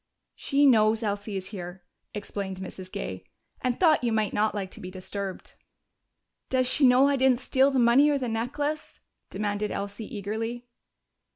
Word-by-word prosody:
"She 285 Hz, +1 st, +1 dB
knows 220 Hz, -3 st, +4 dB
Elsie 205 Hz, -1 st, -2 dB
is 185 Hz, -1 st, -5 dB
here," 180 Hz, -2 st, -8 dB, 0.3 s
explained 200 Hz, -2 st, -5 dB
Mrs. 185 Hz, 0 st, -8 dB
Gay, -, -, -5 dB, 0.4 s
"and 250 Hz, -1 st, -1 dB
thought 315 Hz, -7 st, +4 dB
you 235 Hz, -, +1 dB
might 215 Hz, -2 st, 0 dB
not 215 Hz, 0 st, +1 dB
like 195 Hz, -2 st, -4 dB
to -, -, -10 dB
be 180 Hz, -, -7 dB
disturbed." 190 Hz, +1 st, -6 dB, 1.0 s
"Does 255 Hz, -1 st, +2 dB
she 270 Hz, +1 st, +4 dB
know 255 Hz, +2 st, +6 dB
I 280 Hz, -1 st, +2 dB
didn't 260 Hz, -2 st, +3 dB
steal 265 Hz, +1 st, +3 dB
the 270 Hz, -, -1 dB
money 250 Hz, +4 st, +5 dB
or 290 Hz, -, +2 dB
the 255 Hz, -2 st, -3 dB
necklace?" 285 Hz, +7 st, -3 dB, 0.3 s
demanded 205 Hz, +1 st, -2 dB
Elsie 205 Hz, +2 st, -5 dB
eagerly. 225 Hz, +4 st, -4 dB
220 Hz, 165 wpm, -27 LUFS, 200-260 Hz, 1.0 s, know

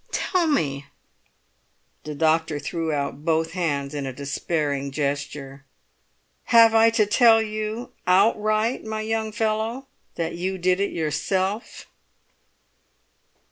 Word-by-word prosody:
"Tell 360 Hz, -3 st, 0 dB
me." 140 Hz, -, -1 dB, 1.2 s
The 150 Hz, -1 st, -5 dB
doctor 160 Hz, 0 st, +1 dB
threw 160 Hz, +3 st, -3 dB
out 145 Hz, 0 st, -3 dB
both 160 Hz, 0 st, +1 dB
hands 150 Hz, -6 st, -2 dB
in 140 Hz, -2 st, -3 dB
a -, -, -3 dB
despairing 140 Hz, +1 st, -2 dB
gesture. 140 Hz, -1 st, -4 dB, 0.8 s
"Have 230 Hz, -1 st, +6 dB
I 225 Hz, 0 st, +6 dB
to 225 Hz, -2 st, +2 dB
tell 225 Hz, +1 st, +5 dB
you 215 Hz, +2 st, -4 dB, 0.2 s
outright, 215 Hz, +4 st, +2 dB
my 220 Hz, 0 st, -4 dB
young 220 Hz, 0 st, -2 dB
fellow, 220 Hz, +4 st, -2 dB, 0.3 s
that 165 Hz, -1 st, -3 dB
you 185 Hz, +2 st, -3 dB
did 180 Hz, +1 st, +1 dB
it 200 Hz, -, 0 dB
yourself?" 185 Hz, +7 st, -2 dB
180 Hz, 115 wpm, -24 LUFS, 145-220 Hz, 1.2 s, Have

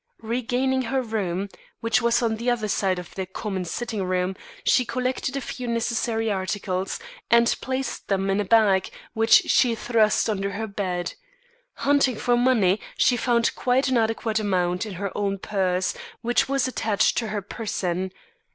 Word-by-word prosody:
Regaining 250 Hz, +3 st, 0 dB
her 260 Hz, +2 st, 0 dB
own 240 Hz, -, -9 dB
room, 195 Hz, -2 st, -1 dB, 0.3 s
which 230 Hz, +1 st, +2 dB
was 235 Hz, +1 st, +2 dB
on 220 Hz, -1 st, +1 dB
the 235 Hz, +2 st, -1 dB
other 235 Hz, -3 st, 0 dB
side 190 Hz, -2 st, +1 dB
of 180 Hz, -, -8 dB
their 190 Hz, -1 st, -4 dB
common 190 Hz, 0 st, -4 dB
sitting 220 Hz, +2 st, -3 dB
room, 185 Hz, 0 st, -1 dB, 0.3 s
she 255 Hz, -, +4 dB
collected 255 Hz, +2 st, -2 dB
a -, -, -2 dB
few 250 Hz, -1 st, -6 dB
necessary 230 Hz, -1 st, 0 dB
articles, 190 Hz, -1 st, -2 dB, 0.3 s
and 235 Hz, 0 st, +5 dB
placed 260 Hz, +1 st, -3 dB
them 195 Hz, -1 st, 0 dB
in 195 Hz, -, +1 dB
a -, -, 0 dB
bag 200 Hz, -2 st, +3 dB, 0.2 s
which 225 Hz, 0 st, +5 dB
she 240 Hz, -2 st, +4 dB
thrust 220 Hz, -2 st, +2 dB
under 200 Hz, -2 st, -1 dB
her 220 Hz, +3 st, -3 dB
bed. 185 Hz, -4 st, -3 dB, 0.6 s
Hunting 280 Hz, -3 st, +2 dB
for 245 Hz, +3 st, +1 dB
money, 230 Hz, -6 st, +3 dB, 0.2 s
she 250 Hz, -, +4 dB
found 235 Hz, -1 st, +2 dB
quite 255 Hz, +2 st, +1 dB
an 260 Hz, -, +2 dB
adequate 225 Hz, 0 st, 0 dB
amount 185 Hz, -1 st, 0 dB
in 205 Hz, -, -6 dB
her 200 Hz, +1 st, -4 dB
own 200 Hz, -1 st, -1 dB
purse, 190 Hz, -2 st, 0 dB, 0.3 s
which 240 Hz, +3 st, +1 dB
was 275 Hz, -2 st, +1 dB
attached 220 Hz, -5 st, +1 dB
to 230 Hz, -, -3 dB
her 205 Hz, -1 st, -3 dB
person. 190 Hz, -4 st, -3 dB
220 Hz, 170 wpm, -24 LUFS, 195-240 Hz, 0.6 s, and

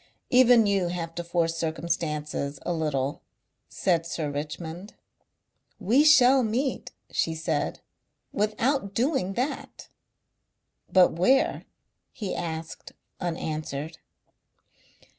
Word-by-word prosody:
"Even 245 Hz, -2 st, +6 dB
you 195 Hz, -3 st, +1 dB
have 170 Hz, -1 st, -4 dB
to 175 Hz, -, -4 dB
force 170 Hz, -1 st, 0 dB
circumstances 155 Hz, -3 st, -2 dB
a 175 Hz, -, 0 dB
little," 145 Hz, -4 st, -2 dB, 0.5 s
said 170 Hz, -4 st, +1 dB
Sir 160 Hz, -3 st, -3 dB
Richmond. 160 Hz, +6 st, -6 dB, 0.8 s
"We 225 Hz, +8 st, +4 dB
shall 270 Hz, -3 st, +6 dB
meet," 250 Hz, +4 st, -1 dB, 0.2 s
she 160 Hz, -, 0 dB
said, 160 Hz, -2 st, -2 dB, 0.5 s
"without 215 Hz, +1 st, 0 dB
doing 245 Hz, -, 0 dB
that." 255 Hz, +7 st, -4 dB, 1.0 s
"But 185 Hz, -1 st, +6 dB
where?" 255 Hz, +11 st, +2 dB, 0.5 s
he 205 Hz, -5 st, -5 dB
asked 160 Hz, -1 st, -6 dB, 0.3 s
unanswered.... 155 Hz, -3 st, -4 dB
175 Hz, 95 wpm, -26 LUFS, 160-225 Hz, 1.0 s, Even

